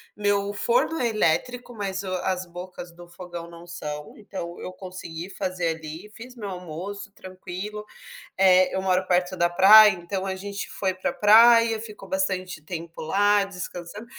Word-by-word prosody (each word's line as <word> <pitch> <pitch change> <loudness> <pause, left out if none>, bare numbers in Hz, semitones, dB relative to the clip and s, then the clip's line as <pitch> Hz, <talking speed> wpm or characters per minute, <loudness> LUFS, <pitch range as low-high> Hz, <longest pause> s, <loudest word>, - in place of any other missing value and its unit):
meu 205 -1 0
forno 235 +10 +1
é 245 - +2
elétrico, 240 +6 0
mas 195 -2 -3
o - - -7 0.2
as 185 0 -1
bocas 175 0 -9
do 175 0 -13
fogão 175 -1 -8
não 170 0 -13
são, 150 -3 -6
então 180 -4 -7
eu 185 - -6
consegui 180 -2 -8
fazer 180 -4 -2
ali, 160 +6 -9
fiz 250 +2 -11
meu 210 -3 -6
almoço 185 +3 -7
tranquilo, 190 +3 -8 0.5
eh, 185 -1 +5
eu 190 - 0
moro 185 0 +1
perto 180 0 +1
da 175 0 +3
praia, 205 +4 +8
então 185 +2 -4
a 190 -1 -2
gente 200 +1 -6
foi 190 -2 -1
pra 185 - -3
praia, 230 +1 +6
ficou 215 -1 -10
bastante 185 - -2
tempo 165 0 -8
lá, 205 +5 +3
descansando, 180 +2 -8
185 Hz, 160 wpm, -25 LUFS, 175-205 Hz, 0.5 s, praia